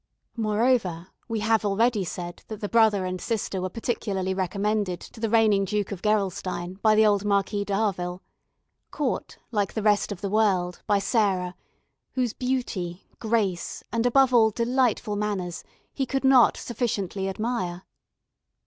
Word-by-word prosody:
Moreover, 215 -6 +1 0.2
we 225 -2 -2
have 220 +1 +2
already 210 +1 +2
said 175 0 -6
that 215 -2 -7
the 205 - -3
brother 215 -4 +3
and 185 0 -4
sister 205 -4 -2
were 185 - -2
particularly 195 -3 -2
recommended 195 0 -1
to 225 - -13
the 225 0 -1
reigning 215 -3 +4
Duke 205 0 -2
of 195 -3 -5
Gerolstein 190 -3 -1
by 215 -1 +5
the 220 0 +5
old 205 -1 +3
Marquis 200 0 0
d'Harville, 190 -3 -1 0.7
caught, 290 -5 -3
like 205 -4 0
the 220 - -2
rest 210 0 +2
of 195 - -6
the 200 - -2
world, 190 -5 +1
by 205 - +4
Sarah, 195 -3 +1 0.6
whose 250 -4 0
beauty, 220 -9 -3
grace, 215 -6 -1
and, 230 +1 +2
above 265 +1 +4
all, 225 -2 +6
delightful 235 -1 0
manners, 200 -4 -3 0.3
he 270 -2 -2
could 270 +1 -1
not 265 -3 +6
sufficiently 205 -5 -2
admire. 190 -4 -3
210 Hz, 150 wpm, -26 LUFS, 190-225 Hz, 0.7 s, all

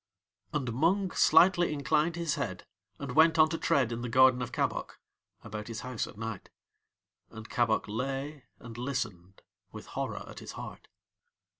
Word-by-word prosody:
And 135 -7 -2
Mung 180 - +2
slightly 175 -2 +5
inclined 150 +3 +1
his 170 -3 -1
head, 95 -5 -4 0.3
and 140 -3 -5
went 160 +4 +5
on 155 0 +6
to 165 - -2
tread 130 -4 +2
in 115 0 -3
the 120 - -4
garden 130 +1 +5
of 120 - -4
Kabok, - - -2 0.4
about 105 -1 -6
his 115 -1 -5
house 125 -2 -3
at - - -13
night. 115 -3 -6 0.8
And 110 0 -10
Kabok 115 -3 +1
lay 135 +6 -4
and 120 -1 -10
listened 105 -8 -4 0.3
with - - -9
horror - - -5
at - - -9
his - - -8
heart. - - -9
130 Hz, 160 wpm, -30 LUFS, 115-155 Hz, 0.8 s, on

